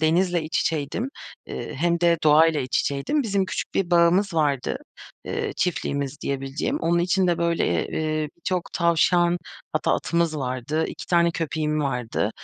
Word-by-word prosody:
denizle 170 Hz, +2 st, +2 dB
iç 155 Hz, +1 st, -1 dB
içeydim, 165 Hz, -, -2 dB, 0.4 s
eee, -, -, -6 dB
hem 170 Hz, +4 st, +1 dB
de 170 Hz, -1 st, +4 dB
doğayla 155 Hz, 0 st, +5 dB
iç 130 Hz, -1 st, 0 dB
içeydim. 140 Hz, -, -1 dB
Bizim 200 Hz, -4 st, 0 dB
küçük -, -, -5 dB
bir 180 Hz, -2 st, 0 dB
bağımız 175 Hz, +2 st, +4 dB
vardı, 145 Hz, -5 st, +1 dB, 0.5 s
eee, 445 Hz, -3 st, -3 dB
çiftliğimiz 140 Hz, -5 st, -2 dB
diyebileceğim. 135 Hz, 0 st, -2 dB
Onun 170 Hz, +1 st, +2 dB
içinde, 180 Hz, -1 st, +2 dB
böyle, 170 Hz, -, +1 dB
eee, 155 Hz, -1 st, -1 dB
birçok 180 Hz, +1 st, -3 dB
tavşan 175 Hz, +1 st, +3 dB, 0.3 s
hatta -, -, +1 dB
atımız 170 Hz, -2 st, 0 dB
vardı. 135 Hz, +4 st, -2 dB
2 -, -, -8 dB
tane 170 Hz, -1 st, +3 dB
köpeğim 155 Hz, -2 st, -1 dB
vardı. 125 Hz, -6 st, -1 dB
165 Hz, 145 wpm, -24 LUFS, 150-175 Hz, 0.5 s, doğayla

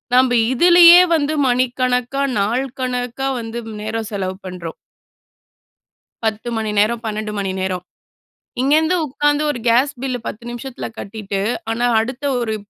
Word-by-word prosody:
நம்ப 255 Hz, -1 st, +4 dB, 0.2 s
இதிலேயே 345 Hz, +4 st, +8 dB
வந்து 300 Hz, 0 st, 0 dB
மணிக்கணக்கா, 250 Hz, +1 st, 0 dB, 0.2 s
நாள் 235 Hz, +7 st, 0 dB, 0.2 s
கணக்கா 250 Hz, +1 st, -2 dB
வந்து 230 Hz, 0 st, -5 dB, 0.2 s
நேரம் 220 Hz, 0 st, -4 dB
செலவு 190 Hz, -2 st, -3 dB
பண்றோம். 175 Hz, -3 st, -7 dB, 1.5 s
10 220 Hz, +2 st, -2 dB
மணி 220 Hz, -1 st, -2 dB
நேரம், 225 Hz, +3 st, +1 dB
12 215 Hz, 0 st, -3 dB
மணி 195 Hz, -1 st, -2 dB
நேரம். 185 Hz, -1 st, -2 dB, 0.8 s
இங்கேருந்து 310 Hz, +6 st, +3 dB
உட்காந்து 295 Hz, +2 st, 0 dB
ஒரு 245 Hz, -, -6 dB
கேஸ் 250 Hz, +5 st, +3 dB
பில்லு 255 Hz, -2 st, -2 dB
10 225 Hz, -, -7 dB
நிமிஷத்துல 240 Hz, +2 st, -6 dB
கட்டிட்டு, 200 Hz, -1 st, -5 dB, 0.3 s
ஆனா 240 Hz, +2 st, 0 dB
அடுத்த 250 Hz, +5 st, -4 dB, 0.2 s
ஒரு 225 Hz, -2 st, -2 dB
240 Hz, 130 wpm, -19 LUFS, 215-270 Hz, 1.5 s, இதிலேயே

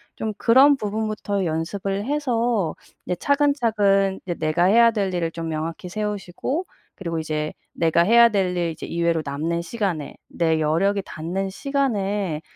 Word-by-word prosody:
좀 220 Hz, -1 st, -3 dB
그런 270 Hz, +6 st, +6 dB
부분부터 210 Hz, -2 st, -2 dB
연습을 195 Hz, +5 st, -2 dB
해서 240 Hz, -, 0 dB, 0.3 s
이제 180 Hz, -, -1 dB
차근차근 220 Hz, -, +2 dB
이제 175 Hz, -2 st, -3 dB
내가 160 Hz, +2 st, +1 dB
해야 230 Hz, +4 st, +6 dB
될 200 Hz, -4 st, -1 dB
일을 170 Hz, -2 st, -1 dB
좀 165 Hz, 0 st, -5 dB
명확히 160 Hz, +3 st, -4 dB
세우시고 210 Hz, -, -3 dB, 0.3 s
그리고 170 Hz, -4 st, -4 dB
이제 155 Hz, -1 st, -3 dB, 0.2 s
내가 165 Hz, 0 st, +2 dB
해야 235 Hz, +5 st, +6 dB
될 190 Hz, -4 st, 0 dB
일 175 Hz, -1 st, 0 dB
이제 160 Hz, -, -8 dB
이외로 170 Hz, -1 st, 0 dB
남는 160 Hz, +4 st, -2 dB
시간에, 170 Hz, -6 st, -3 dB
내 160 Hz, -2 st, 0 dB
여력이 180 Hz, +7 st, +1 dB
닿는 180 Hz, +5 st, -4 dB
시간에 205 Hz, -, -1 dB
195 Hz, 310 characters per minute, -23 LUFS, 165-220 Hz, 0.3 s, 그런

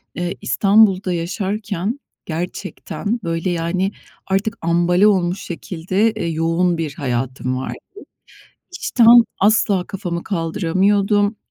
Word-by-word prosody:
Eee, 175 Hz, 0 st, -3 dB
İstanbul'da 195 Hz, -3 st, +3 dB
yaşarken 200 Hz, +5 st, -3 dB, 0.3 s
gerçekten, 190 Hz, +6 st, -4 dB
böyle, 165 Hz, +1 st, -2 dB
yani, 175 Hz, +3 st, -1 dB, 0.4 s
artık 200 Hz, +4 st, -1 dB
ambale 175 Hz, +4 st, +3 dB
olmuş 185 Hz, -2 st, +1 dB
şekilde, 185 Hz, +4 st, -1 dB
eee, 215 Hz, -5 st, -4 dB
yoğun 165 Hz, +2 st, +1 dB
bir 160 Hz, -3 st, -3 dB
hayatım 130 Hz, -1 st, -2 dB
vardı. 130 Hz, -, -5 dB, 1.0 s
İşten, 235 Hz, 0 st, +6 dB
asla 205 Hz, -2 st, +3 dB
kafamı 180 Hz, -4 st, -4 dB
kaldıramıyordum, 200 Hz, +4 st, +1 dB
185 Hz, 100 wpm, -19 LUFS, 165-205 Hz, 1.0 s, İşten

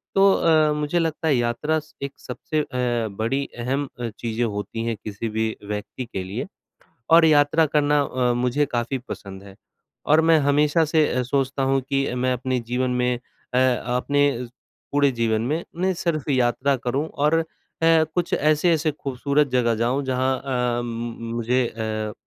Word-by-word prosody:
तो 195 Hz, 0 st, +6 dB
अ, 155 Hz, -2 st, +3 dB
मुझे 150 Hz, +3 st, 0 dB
लगता 160 Hz, -1 st, -1 dB
है 150 Hz, -, +4 dB
यात्रा 120 Hz, +6 st, 0 dB
स 155 Hz, -, -17 dB
एक 140 Hz, -, -4 dB
सबसे 150 Hz, +4 st, -3 dB
अ, -, -, -4 dB, 0.6 s
बड़ी 135 Hz, +5 st, 0 dB
अहम 135 Hz, +4 st, -1 dB
अ, 120 Hz, -1 st, -2 dB
चीज़ें 115 Hz, +2 st, -3 dB
होती 105 Hz, +1 st, -4 dB
हैं 115 Hz, -1 st, -1 dB
किसी 105 Hz, +2 st, -4 dB
भी 110 Hz, 0 st, -1 dB
व्यक्ति 105 Hz, +4 st, -5 dB
के 95 Hz, -, -2 dB
लिए 105 Hz, -, -5 dB, 0.6 s
और 165 Hz, 0 st, +8 dB
यात्रा 155 Hz, +1 st, +4 dB
करना 145 Hz, 0 st, +3 dB
अ, 125 Hz, -3 st, 0 dB
मुझे 125 Hz, +4 st, +1 dB
काफ़ी 120 Hz, +2 st, -1 dB
पसंद 95 Hz, -1 st, -8 dB
है 100 Hz, -1 st, -13 dB, 0.5 s
और 155 Hz, +2 st, +5 dB
मैं 160 Hz, -1 st, +6 dB
हमेशा 150 Hz, +3 st, +3 dB
से 155 Hz, 0 st, +3 dB
अ, 125 Hz, -, 0 dB
सोचता 135 Hz, +1 st, -1 dB
हूँ 135 Hz, 0 st, +2 dB
कि 135 Hz, -2 st, 0 dB
मैं 130 Hz, +1 st, +1 dB
अपने 125 Hz, +1 st, -1 dB
जीवन 125 Hz, +1 st, 0 dB
में 125 Hz, 0 st, +1 dB, 0.4 s
अ, -, -, +2 dB
अपने 130 Hz, +2 st, +2 dB, 0.7 s
पूरे 145 Hz, -1 st, +4 dB
जीवन 110 Hz, -2 st, +1 dB
में 160 Hz, +5 st, -1 dB
नहीं 185 Hz, +2 st, 0 dB
सिर्फ 170 Hz, -5 st, -2 dB
यात्रा 130 Hz, +1 st, +2 dB
करूँ 135 Hz, +6 st, 0 dB
और 150 Hz, +3 st, +1 dB
अ, -, -, 0 dB, 0.4 s
कुछ 165 Hz, +1 st, +2 dB
ऐसे-ऐसी 155 Hz, +1 st, +2 dB
खूबसूरत 140 Hz, +1 st, 0 dB
जगह 120 Hz, -2 st, +2 dB
जाऊँ, 120 Hz, +5 st, 0 dB
जहाँ 130 Hz, 0 st, 0 dB
अ, 125 Hz, -3 st, -1 dB
म 115 Hz, 0 st, -5 dB
मुझे 120 Hz, +2 st, +1 dB
अ, 110 Hz, -1 st, -4 dB
130 Hz, 165 wpm, -23 LUFS, 120-150 Hz, 0.7 s, और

